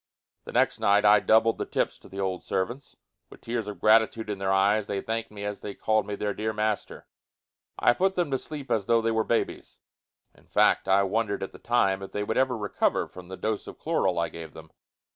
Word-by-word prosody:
The - - -8
next - - +2
night 100 +1 +3
I 105 0 +7
doubled 110 +2 +3
the - - -1
tips - - -1
to - - -16
the 95 - -8
old 95 -2 -2
servants. 120 +8 -3 0.3
With - - -15
tears 115 -2 -3
of 105 -4 -7
gratitude 110 +1 +3
in 100 - -5
their 95 0 0
eyes, 100 +2 +3
they 100 - -2
thanked 115 +2 -3
me 105 -1 -9
as 105 0 -4
they 100 - -6
called 110 -1 +1
me 105 - -3
their 105 0 -2
dear 110 +2 -2
master. 105 -1 -2 0.7
I 120 - +4
put 190 +6 +1
them 175 -5 0
to 135 - 0
sleep 145 -3 -8
as 105 -4 0
though 115 -1 +4
they 115 - +1
were 110 0 +1
babies. 115 - -2 0.6
In - - -24
fact, - - +3
I 100 +1 +4
wondered 100 0 -1
at 95 - -5
the - - -14
time 100 -5 +1
if 95 - -9
they 105 - -1
would 110 - -2
ever 130 -2 +2
recover 105 -2 0
from 90 -1 -12
the 95 +1 -8
dose 110 -1 -3
of - - -9
chloral 95 - 0
I 85 0 0
gave 80 -2 -10
them. 80 0 -12
105 Hz, 230 wpm, -27 LUFS, 95-115 Hz, 0.7 s, I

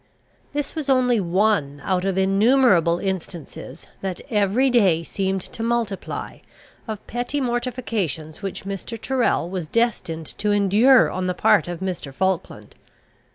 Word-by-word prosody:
This 290 -1 -3
was 305 -4 -4
only 250 -3 +3
one 175 -6 +1
out 185 -1 0
of 195 -1 0
innumerable 195 -3 +4
instances, 175 -6 -6 0.2
that 190 -2 -4
every 215 +5 +2
day 190 -9 +3
seemed 190 +2 -2
to - - -6
multiply, 230 -4 -3 0.5
of 215 -2 -6
petty 245 +5 -3
mortifications 230 - -3
which 195 -1 -5
Mr. 200 +4 -5
Tyrrel 255 -7 0
was 180 -3 -4
destined 185 -7 -1
to 210 - 0
endure 205 +6 +5
on 185 0 -2
the 180 - -1
part 190 -2 +3
of 175 0 -5
Mr. 180 -7 -4
Falkland. 190 +5 -2
195 Hz, 135 wpm, -22 LUFS, 180-235 Hz, 0.5 s, endure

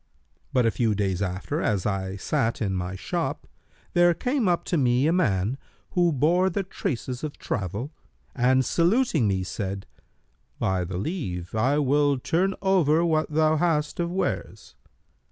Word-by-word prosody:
But 125 -4 +2
a 115 - +3
few 110 -3 +1
days 95 -2 -1
after, 95 - -2
as 100 -4 0
I 95 -2 -2
sat 115 +3 -1
in 100 -4 -1
my 90 0 -3
shop, - - -3 0.5
there 175 -1 +5
came 250 - 0
up 175 -1 +2
to 180 - -2
me 125 0 +3
a 160 - +3
man, 110 - +1 0.3
who 175 -1 +3
bore 170 +7 +3
the 195 +2 -2
traces 130 -7 -4
of 150 -2 -5
travel, 105 - -3 0.4
and 130 +1 +3
saluting 170 - +2
me, 95 -2 0
said, 95 0 -4 0.7
'By 95 -1 0
thy 90 +1 -6
leave, 95 - -4
I 125 +6 +2
will 145 0 +2
turn 185 +9 0
over 170 -4 +3
what 155 -2 +1
thou 155 +1 +2
hast 150 -2 0
of 170 0 -1
wares.' 190 - -3
140 Hz, 155 wpm, -25 LUFS, -, 0.7 s, there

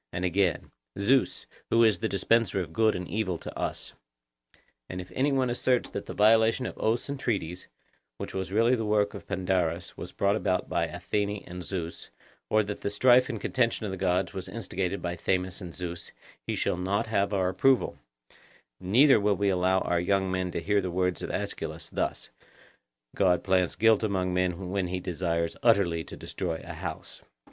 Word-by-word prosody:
And 90 - -2
again— 90 -1 0 0.3
'Zeus, 130 +7 +2 0.2
who 115 0 +5
is 110 -6 +4
the - - -1
dispenser 100 +1 +2
of 85 -3 -5
good 110 +2 +3
and 90 0 -4
evil 95 -2 -1
to - - -9
us.' - - -4 1.0
And 90 - -5
if 90 0 -8
any 140 +2 +1
one 130 -2 +1
asserts 125 0 +1
that - - -5
the - - -6
violation 110 +3 +4
of - - -5
oaths 115 +2 0
and 140 -1 -4
treaties, 90 -9 -2 0.5
which - - -6
was 95 0 -3
really 115 +4 +3
the 115 -3 +1
work 105 -1 +1
of - - -9
Pandarus, 90 -2 -1
was - - -7
brought 100 +1 +1
about 90 -4 0
by - - 0
Athene 105 -1 -2
and 90 0 -7
Zeus, 85 -3 -5 0.4
or 110 0 +3
that 105 0 -6
the - - -1
strife 125 +5 +5
and 115 -4 -3
contention 115 0 0
of 100 - -3
the 95 - -4
gods 90 -1 +1
was 95 0 -6
instigated 95 -2 -3
by 85 0 -2
Themis 90 +2 -1
and 90 -2 -7
Zeus, 85 -1 -6 0.3
he - - -1
shall - - 0
not 100 +5 0
have 100 -3 0
our 95 -3 +1
approval; 130 +7 +2 0.8
neither 115 +8 +5
will 105 0 +2
we 100 0 +1
allow 95 0 +2
our 85 - +1
young 95 +1 +1
men 95 -1 -1
to - - -2
hear 105 +2 +2
the 90 - -3
words 90 0 0
of - - -4
Aeschylus, - - -4
that - - -2 0.9
'God 90 -3 +3
plants 90 -4 +2
guilt 110 -1 +4
among 95 -4 0
men 90 0 -1
when 95 -2 0
he 90 +1 -3
desires 85 -2 -2
utterly 100 -8 +3
to - - -10
destroy 85 -3 -4
a - - -7
house. - - -7
95 Hz, 190 wpm, -28 LUFS, 90-110 Hz, 1.0 s, who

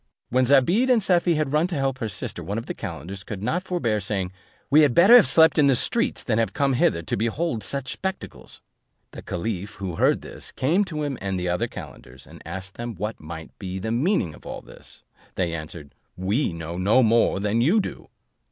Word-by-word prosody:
When 130 +1 +2
Zobeide 155 - +4
and 250 -2 +5
Safie 175 -2 +3
had 150 -2 -1
run 155 +3 +3
to 180 - -4
help 135 -2 -1
their 110 - -2
sister, 90 - -5
one 100 - -4
of 115 - -4
the - - -4
calenders 95 0 -7
could 100 -2 -7
not 160 +11 0
forbear 170 - -1
saying, 95 -2 -2 0.4
"We 150 +2 +7
had 145 -5 +3
better 195 +8 +8
have 245 - +8
slept 160 -1 +5
in 145 - +5
the 135 - +4
streets 235 - 0
than 115 -2 0
have 110 -4 0
come 140 -1 +1
hither 85 -8 +2
to - - -2
behold 115 +4 -1
such 140 -2 -3
spectacles." 190 0 -6 0.5
The - - -9
caliph, 100 +2 -4
who 95 -4 -5
heard - - +2
this, - - -9
came 165 +10 +2
to 155 -5 -4
him 140 -4 -3
and 95 -1 -2
the 90 0 -2
other 90 0 0
calenders, 65 +2 -11
and - - -14
asked 95 +2 -7
them 120 -1 -5
what 105 +5 -4
might 80 +1 -9
be 95 -2 -5
the 110 +4 -3
meaning 125 - +1
of - - -15
all - - -7
this? - - -15 0.3
They 90 -3 -1
answered, 75 -2 -7 0.2
"We 100 +8 0
know 85 +1 -6
no 105 +7 +4
more 115 -3 +3
than 105 +3 0
you 170 - +4
do." - - -5
115 Hz, 215 wpm, -24 LUFS, 95-150 Hz, 0.5 s, better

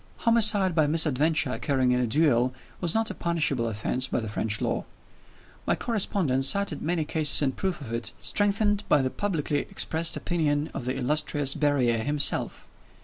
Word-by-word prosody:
Homicide 210 -5 +4
by 155 -2 +2
misadventure, 155 -1 +2
occurring 130 -1 0
in 125 - +2
a 125 - 0
duel, 130 -1 +2 0.2
was 175 0 0
not 225 -1 0
a - - -5
punishable 155 -10 -1
offense 115 +4 -2
by - - -1
the 110 - -5
French 105 0 -2
law. - - -2 0.8
My - - +2
correspondent 185 - 0
cited 200 -2 0
many 165 -1 -1
cases 150 -1 0
in 135 - +1
proof 185 +3 -3
of 115 -4 -7
it, 115 0 -2
strengthened 205 0 +2
by 145 - +4
the 130 - -1
publicly 160 -7 -2
expressed 160 +1 -1
opinion 155 -3 -1
of 120 - -6
the 130 +1 -2
illustrious 145 +1 0
Berryer 140 -6 +1
himself. 145 +5 -1
150 Hz, 165 wpm, -26 LUFS, 130-175 Hz, 0.8 s, Homicide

